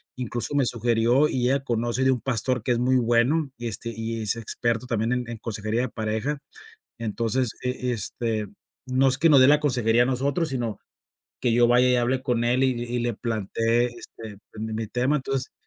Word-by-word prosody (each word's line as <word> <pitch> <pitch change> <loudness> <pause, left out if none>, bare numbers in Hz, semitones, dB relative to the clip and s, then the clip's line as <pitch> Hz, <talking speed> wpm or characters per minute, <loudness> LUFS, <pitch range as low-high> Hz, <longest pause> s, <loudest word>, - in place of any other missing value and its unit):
incluso 120 +1 -4
me 140 -2 +3
sugirió 120 +4 +2
y 125 -1 0
ella 135 +1 +1
conoce 120 0 -1
de 130 - +5
un 125 -3 -1
pastor 125 -1 -1
que 125 - 0
es - - 0
muy 130 +1 +3
bueno 125 +6 +2
y, 120 0 -5
este, 115 +2 -4
y 115 0 -4
es 105 0 0
experto 115 +1 -2
también 115 -1 -1
en 125 0 -2
en 120 - -5
consejería 110 +1 -2
de 130 - -2
pareja, 110 +6 -2 0.6
entonces 115 +2 -1
e 125 0 -2
este, 115 -1 -2 0.4
no 130 +1 +3
es 130 - +1
que 165 +4 +4
nos 140 -3 +7
dé 130 - +7
la 150 +1 +6
consejería 120 -5 +2
a - - -2
nosotros, 140 +5 0
sino 120 -5 -3 0.6
que 120 -2 +1
yo 120 +1 +5
vaya 125 +1 +4
y 125 - +4
hable 125 +2 0
con 120 -3 0
él 125 +2 +2
y 130 - +3
y 120 0 -2
le 120 -1 -1
plantee 115 +2 0
este 115 -3 -10
pues 110 - -8
mi 110 - -5
mi 110 0 -3
tema, 125 +6 +1
entonces, 135 -1 -3
120 Hz, 205 wpm, -25 LUFS, 115-130 Hz, 0.6 s, nos